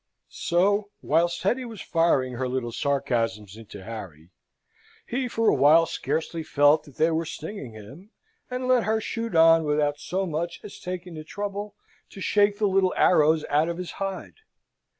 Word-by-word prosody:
So, 200 +4 +2
whilst 170 +3 +1
Hetty 245 +7 +1
was 230 -4 -8
firing 165 -8 +1
her 130 +1 -2
little 125 -2 -3
sarcasms 115 -7 -1
into 105 -3 -11
Harry, 95 -7 -9 0.7
he 250 +1 -2
for 225 -1 0
a - - +5
while 150 +4 +5
scarcely 165 +1 -3
felt 150 0 +3
that 145 - -16
they 160 +2 +2
were 160 +1 0
stinging 160 - -7
him, 135 - -12 0.4
and 255 0 -3
let 250 -4 +3
her 220 +1 +1
shoot 230 -2 -4
on 165 0 +6
without 150 -1 0
so 190 +2 -2
much 170 0 -3
as 210 - -10
taking 180 -1 -6
the 155 -1 -7
trouble 205 +4 -5 0.3
to - - -12
shake 205 +1 +2
the 215 - +1
little 190 -1 +2
arrows 155 -2 +4
out 155 +3 +2
of 170 - -4
his 180 -1 -5
hide. 195 - -4
165 Hz, 170 wpm, -25 LUFS, 140-200 Hz, 0.7 s, on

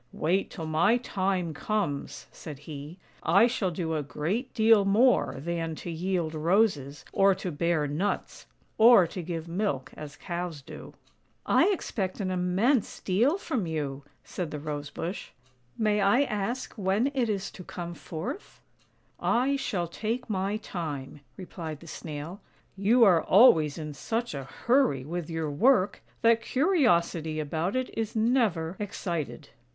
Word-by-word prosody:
" - - -40 0.2
Wait 190 +4 +2
till 165 - -6
my 160 +9 +3
time 190 -7 -1
comes," 175 -4 -3
said 150 -4 -9
he; 150 +2 -8 0.2
"I 195 +7 +5
shall 230 -6 0
do 165 -1 -3
a 155 - 0
great 160 - -3
deal 220 -2 +5
more 220 +6 +3
than 165 +2 -3
to 170 - -6
yield 170 -1 -1
roses, 155 -4 +1
or 195 0 +4
to 185 - -4
bear 165 0 0
nuts, 155 +8 -3 0.3
or 225 -4 +8
to 180 +2 -6
give 165 -1 -5
milk 165 -7 -2
as 145 -1 -9
cows 170 -3 -5
do." - - -11 0.3
" - - -42 0.2
I - - +4
expect 215 - -2
an 190 -2 -1
immense 185 +8 +1
deal 235 - +2
from 235 - -2
you," 145 -4 -3 0.2
said 175 -4 -5
the 150 - -5
Rose 145 -1 -5
bush. 170 +7 -5 0.2
" 125 -1 -37
May 210 -2 +2
I 200 +8 +4
ask 235 0 -3
when 205 +5 0
it 250 -4 0
is 195 -2 -2
to 185 - -10
come 175 -1 -6
forth? 170 - -7 0.2
" - - -39
" - - -41 0.2
I 280 +2 +1
shall 185 -10 -2
take 225 +8 -3
my 200 -1 -1
time," 150 - -6 0.2
replied 165 -5 -7
the 170 - -14
Snail. 160 +2 -7 0.2
" - - -37
You 220 +5 +4
are 180 -6 +6
always 165 - +5
in 150 -2 -5
such 225 +10 -3
a 135 -2 -5
hurry 235 - +1
with 170 +1 -4
your 160 -2 -2
work, 205 - +3 0.2
that 230 0 +5
curiosity 175 - +1
about 160 - -2
it 255 0 -2
is 225 0 -3
never 220 -8 +1
excited." 175 -6 -4
180 Hz, 160 wpm, -28 LUFS, 155-215 Hz, 0.3 s, or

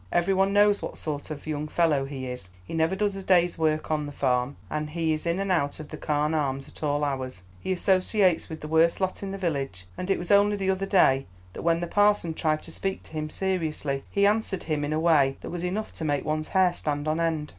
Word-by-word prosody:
Every 175 +3 +2
one 195 +1 +2
knows 205 0 +4
what - - -5
sort 145 -2 -4
of 150 -2 -7
young 155 -1 -3
fellow 150 -4 +2
he 135 -2 -6
is; 125 -8 -6 0.2
he - - -8
never 165 +3 +1
does 205 0 0
a 195 - -5
day's 175 -2 +3
work 155 -1 0
on 150 -1 0
the - - -6
farm, 130 -1 0
and 150 0 -3
he 160 0 0
is 155 +2 -3
in 170 +2 +1
and 195 -1 -1
out 145 -5 0
of 155 - -8
the - - -6
'Carne 150 +1 0
Arms' 140 -3 -1
at - - -14
all 145 -1 0
hours. 130 -8 -3 0.2
He 190 - -3
associates 185 0 +2
with 160 -1 -7
the 150 - -6
worst 160 +2 +3
lot 190 -1 -1
in 200 - -4
the 195 - -4
village, 140 - -3
and 180 - -4
it 195 - +3
was 175 - -4
only 205 +1 +5
the 190 -1 0
other 195 +1 -2
day 135 -9 +4 0.3
that - - -7
when 170 0 +2
the - - -1
parson 205 -3 +2
tried 155 -1 0
to 165 - -11
speak 195 +3 -3
to - - -16
him 155 -1 -3
seriously, 155 -7 -2
he 200 0 +2
answered 205 -2 +1
him 150 -2 -1
in 145 - -2
a 155 - +1
way 150 -5 +3
that - - -7
was 175 0 -4
enough 195 +4 -3
to - - -7
make 145 -2 0
one's 155 0 -1
hair 185 -2 +3
stand 145 -2 -3
on 155 +1 0
end." 160 -3 0
160 Hz, 250 wpm, -26 LUFS, 145-190 Hz, 0.3 s, only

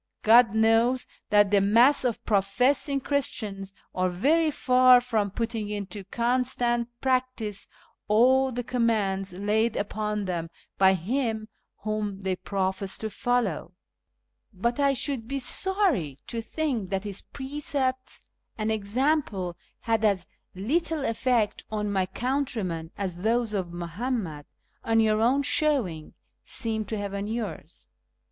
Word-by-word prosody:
God 225 -1 +6
knows 225 +3 +3 0.2
that 205 -2 +4
the 200 -1 +4
mass 235 +9 +5
of 245 -3 -2
professing 250 +8 +2
Christians 205 -9 -2 0.2
are 185 0 +1
very 300 - +2
far 255 -3 +5
from 225 -5 -1
putting 225 0 -3
into 205 -1 -5
constant 240 +1 0
practice 255 -6 -1 0.4
all 260 +5 +4
the 245 0 -3
commands 210 -6 0
laid 210 +4 0
upon 210 0 -2
them 170 -3 -3 0.3
by 190 0 +6
Him 220 +3 -2 0.3
whom 210 -2 -3
they 190 -1 0
profess 190 0 -2
to 220 -1 -5
follow; 225 -9 -1 0.8
but 235 +6 -2
I 280 -1 +3
should 260 -3 -1
be 275 +2 -2
sorry 290 - +1
to 230 -1 -4
think 245 - -2
that 195 0 -2
His 200 -2 -3
precepts 265 -2 -3 0.3
and 215 0 -1
example 215 - 0 0.3
had 225 -1 0
as 195 -4 +2 0.3
little 300 - -1
effect 230 -2 0
on 210 -1 -2
my 190 -2 +1
countrymen 220 -8 -2
as 180 -3 -4
those 225 +1 +1
of 185 -4 -2
Muhammad, 175 - -4 0.4
on 225 0 +2
your 215 -1 +3
own 260 +5 +3
showing, 250 - 0 0.3
seem 220 -2 -1
to 215 +2 -3
have 200 -1 -4
on 200 +1 -3
yours." 225 0 -6
220 Hz, 130 wpm, -26 LUFS, 195-255 Hz, 0.8 s, God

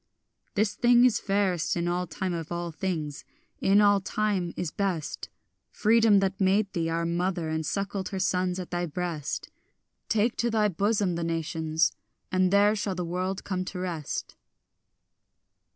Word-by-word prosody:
This 205 0 +2
thing 240 0 +5
is 250 - +3
fairest 195 -5 0
in 170 0 -1
all 180 +1 -1
time 175 +3 -3
of 165 -1 -5
all 170 0 -3
things, 160 -4 -3 0.4
in 200 +2 +4
all 205 -1 +5
time 195 -3 -1
is 170 -4 -2
best— 180 -7 -3 0.4
Freedom, 220 -1 +4
that 195 0 -1
made 195 +1 +2
thee, 165 -3 -1
our 165 +1 -1
mother, 175 -1 -1
and 160 0 -1
suckled 195 +4 -2
her 195 - -4
sons 185 -1 0
at 180 - -7
thy 175 0 -1
breast; 165 -2 -4 0.6
Take 225 +2 +2
to 235 - +1
thy 215 -2 +2
bosom 200 +1 +1
the 170 0 -2
nations, 160 0 0 0.4
and 185 0 +3
there 205 +2 +4
shall 200 -2 -2
the 180 -1 -3
world 185 +3 -2
come 185 -2 -2
to 185 - -6
rest. 175 -5 -4
185 Hz, 160 wpm, -27 LUFS, 170-200 Hz, 0.6 s, thing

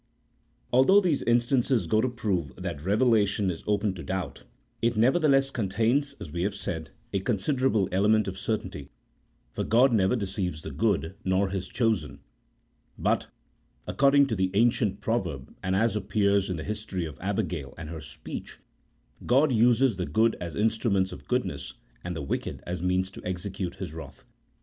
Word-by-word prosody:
Although 135 +11 +6
these 170 -7 +1
instances 120 -2 +2
go 110 +6 +2
to 130 - +1
prove 95 - -2
that 70 - -5
revelation 105 -1 +2
is 80 - -8
open 105 -1 +1
to 90 - -8
doubt, 95 0 -4 0.4
it 115 -1 +1
nevertheless 135 +2 +4
contains, 115 +6 0
as 75 - -8
we 85 +2 -3
have 100 +3 -1
said, 80 -2 -4 0.2
a 100 - +2
considerable 110 0 +1
element 105 +3 +3
of - - -5
certainty, 70 -1 -3 0.6
for - - -3
God 120 +3 +4
never 100 +2 +3
deceives 95 -7 -3
the 80 - -6
good, 85 +2 0
nor 95 +1 +1
His 95 -1 -3
chosen, 115 -5 0 0.8
but - - 0 0.6
(according 140 +1 +4
to 120 -5 -2
the 95 -1 +1
ancient 105 -3 +2
proverb, 95 - -2
and 95 0 0
as 110 +3 +2
appears 100 -1 +1
in 90 - -2
the 80 - -5
history 105 -4 -4
of 75 -4 -9
Abigail 90 -7 -3
and 80 - -7
her 80 -2 -6
speech), - - -8 0.7
God 135 +4 +4
uses 120 -1 +4
the 90 - -2
good 110 +10 +2
as 85 -2 -5
instruments 105 -3 +1
of - - -10
goodness, 70 - -2 0.3
and 90 0 -4
the 70 - -4
wicked 70 - -4
as 90 -1 -4
means 90 +1 0
to - - -10
execute 90 0 -4
His - - -6
wrath. - - -10
100 Hz, 165 wpm, -27 LUFS, 90-120 Hz, 0.8 s, Although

